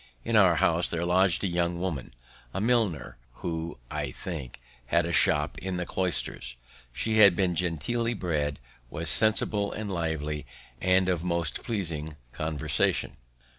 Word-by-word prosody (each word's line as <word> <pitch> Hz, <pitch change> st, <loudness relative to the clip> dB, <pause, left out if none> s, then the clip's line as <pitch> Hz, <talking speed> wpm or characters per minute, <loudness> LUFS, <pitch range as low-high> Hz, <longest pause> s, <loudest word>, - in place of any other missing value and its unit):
In 115 Hz, -, 0 dB
our 95 Hz, -5 st, +6 dB
house 85 Hz, -1 st, +2 dB
there 85 Hz, 0 st, -2 dB
lodg'd 90 Hz, 0 st, +3 dB
a -, -, +2 dB
young 85 Hz, -1 st, -1 dB
woman, 80 Hz, -10 st, -3 dB, 0.4 s
a -, -, 0 dB
milliner, 100 Hz, -, 0 dB, 0.3 s
who, 80 Hz, 0 st, -3 dB
I 75 Hz, -2 st, -2 dB
think, 70 Hz, -2 st, -7 dB, 0.3 s
had 85 Hz, +5 st, +2 dB
a 85 Hz, -, -3 dB
shop 75 Hz, -1 st, +3 dB
in 95 Hz, -1 st, -4 dB
the 90 Hz, -, -2 dB
Cloisters. 85 Hz, -10 st, -2 dB, 0.3 s
She 110 Hz, -, 0 dB
had 100 Hz, -4 st, +8 dB
been 90 Hz, -1 st, +1 dB
genteelly 90 Hz, -, -1 dB
bred, 75 Hz, -7 st, -2 dB, 0.3 s
was 80 Hz, +4 st, +1 dB
sensible 105 Hz, -1 st, +3 dB
and 105 Hz, -1 st, -5 dB
lively, 75 Hz, -4 st, -3 dB, 0.3 s
and 95 Hz, 0 st, +3 dB
of 90 Hz, -3 st, 0 dB
most 85 Hz, -3 st, 0 dB
pleasing 80 Hz, -9 st, -3 dB, 0.2 s
conversation. 75 Hz, -1 st, 0 dB
85 Hz, 145 wpm, -27 LUFS, 75-95 Hz, 0.4 s, had